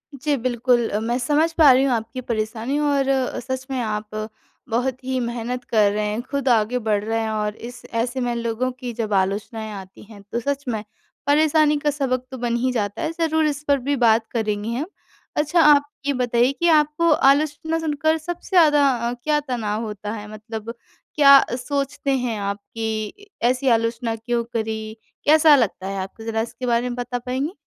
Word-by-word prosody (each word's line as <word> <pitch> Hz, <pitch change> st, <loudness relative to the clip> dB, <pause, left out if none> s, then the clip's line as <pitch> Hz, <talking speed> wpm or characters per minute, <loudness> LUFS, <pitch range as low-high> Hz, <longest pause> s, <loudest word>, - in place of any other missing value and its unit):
जी, 290 Hz, +2 st, 0 dB
बिल्कुल। 240 Hz, -1 st, +1 dB
अ, 210 Hz, -, -1 dB
मैं 235 Hz, +2 st, -1 dB
समझ 300 Hz, +6 st, +2 dB
पा 305 Hz, -5 st, +7 dB
रही 260 Hz, +2 st, +4 dB
हूँ 265 Hz, -3 st, +2 dB
आपकी 230 Hz, +3 st, -3 dB
परेशानी 225 Hz, +4 st, -2 dB
और 285 Hz, -2 st, +1 dB, 0.3 s
सच 260 Hz, +1 st, -5 dB
में 260 Hz, -, -1 dB
आप 210 Hz, -1 st, -3 dB, 0.6 s
बहुत 255 Hz, +2 st, -1 dB
ही 260 Hz, 0 st, -1 dB
मेहनत 240 Hz, +1 st, -3 dB
कर 215 Hz, -4 st, +3 dB
रहे 210 Hz, +1 st, -1 dB
हैं, 210 Hz, +3 st, -2 dB
खुद 275 Hz, +1 st, -4 dB
आगे 230 Hz, +1 st, +2 dB
बढ़ 205 Hz, -1 st, +1 dB
रहे 225 Hz, +1 st, -1 dB
हैं 220 Hz, -, -2 dB
और 210 Hz, 0 st, -2 dB
इस 245 Hz, +1 st, -9 dB
ऐसे 240 Hz, +3 st, -1 dB
में 240 Hz, -1 st, -1 dB
लोगों 235 Hz, +2 st, -1 dB
की 250 Hz, -2 st, -4 dB
जब 215 Hz, -2 st, -3 dB
आलोचनाएँ 210 Hz, +3 st, -1 dB
आती 190 Hz, 0 st, -10 dB
हैं 205 Hz, -1 st, -14 dB
तो 235 Hz, -, -1 dB
सच 280 Hz, +3 st, -2 dB
में 220 Hz, -3 st, -2 dB, 0.4 s
परेशानी 300 Hz, 0 st, +4 dB
का 295 Hz, 0 st, 0 dB
सबक 260 Hz, -3 st, -1 dB
तो 260 Hz, -, -6 dB
बन 240 Hz, -1 st, -1 dB
ही 255 Hz, +2 st, 0 dB
जाता 205 Hz, -, -2 dB
है, 320 Hz, -1 st, -1 dB
ज़रूर 320 Hz, -1 st, +2 dB
इस 295 Hz, 0 st, -3 dB
पर 285 Hz, -1 st, +4 dB
भी 285 Hz, -, +2 dB
बात 225 Hz, -3 st, +3 dB
करेंगे 215 Hz, -2 st, -2 dB
हम। 275 Hz, +5 st, -2 dB, 0.5 s
अच्छा, 310 Hz, +3 st, +3 dB
आप 290 Hz, -1 st, +5 dB, 0.2 s
ये 285 Hz, -, +1 dB
बताइए 245 Hz, +1 st, +2 dB
कि 345 Hz, -, +2 dB
आपको 305 Hz, +1 st, +3 dB
आलोचना 300 Hz, +3 st, +2 dB
सुनकर 315 Hz, 0 st, 0 dB
सबसे 350 Hz, +4 st, -7 dB
ज़्यादा 295 Hz, -4 st, +6 dB, 0.2 s
अ, -, -, -3 dB
क्या 300 Hz, -1 st, +2 dB
तनाव 230 Hz, -6 st, -3 dB
होता 210 Hz, 0 st, -6 dB
है 210 Hz, -2 st, -7 dB
मतलब 220 Hz, +1 st, -7 dB, 0.4 s
क्या 280 Hz, -2 st, +8 dB, 0.2 s
सोचते 275 Hz, +1 st, -2 dB
हैं 240 Hz, -3 st, -2 dB
आप 200 Hz, 0 st, -2 dB, 0.2 s
कि 220 Hz, -, -4 dB
ऐसी 255 Hz, +3 st, +1 dB
आलोचना 230 Hz, 0 st, -1 dB
क्यों 235 Hz, +1 st, -2 dB
करी? 220 Hz, -1 st, -3 dB, 0.3 s
कैसा 305 Hz, 0 st, +7 dB
लगता 200 Hz, -6 st, 0 dB
है 195 Hz, 0 st, -4 dB
आपको 195 Hz, +4 st, -8 dB
ज़रा 225 Hz, 0 st, -1 dB
इसके 235 Hz, +2 st, -6 dB
बारे 240 Hz, 0 st, +1 dB
में 240 Hz, -, -4 dB
बता 245 Hz, 0 st, -3 dB
पाएँगे? 260 Hz, +7 st, -3 dB
245 Hz, 190 wpm, -22 LUFS, 220-285 Hz, 0.6 s, क्या